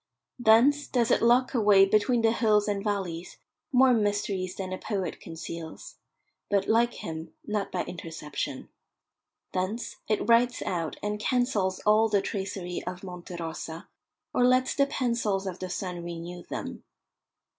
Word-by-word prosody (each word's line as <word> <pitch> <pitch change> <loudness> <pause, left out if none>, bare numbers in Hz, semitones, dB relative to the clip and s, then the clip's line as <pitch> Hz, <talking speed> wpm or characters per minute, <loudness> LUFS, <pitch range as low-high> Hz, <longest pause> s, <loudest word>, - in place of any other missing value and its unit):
Thence 245 +6 +5
does 240 -2 +1
it - - +4
lock 245 +3 +4
away 205 -5 +6
between 215 +4 +2
the 225 - +5
hills 215 -3 +3
and 200 -1 -1
valleys 185 -5 -3 0.3
more 260 0 +6
mysteries 205 -4 0
than 185 -1 -4
a 185 - -4
poet 195 -4 -3
conceals, 165 - -8 0.5
but, 200 -1 +1
like 235 +2 +3
him, 160 0 -7
not 210 -2 -2
by 180 - -1
interception. 165 -3 -5 0.8
Thence 185 +6 -3
it 210 -1 0
writes 240 +1 +4
out 165 -3 -2
and 210 0 -2
cancels 215 -6 0
all 215 +1 +4
the 205 -1 +3
tracery 190 -3 -4
of 180 +1 -5
Monte 180 -1 -8
Rosa, 165 -1 -6 0.4
or 250 - +3
lets 255 +1 +4
the 280 -1 +3
pencils 235 -7 0
of 185 -2 -5
the 185 - -5
sun 180 -1 -4
renew 170 +1 -6
them. - - -6
205 Hz, 145 wpm, -28 LUFS, 180-230 Hz, 0.8 s, away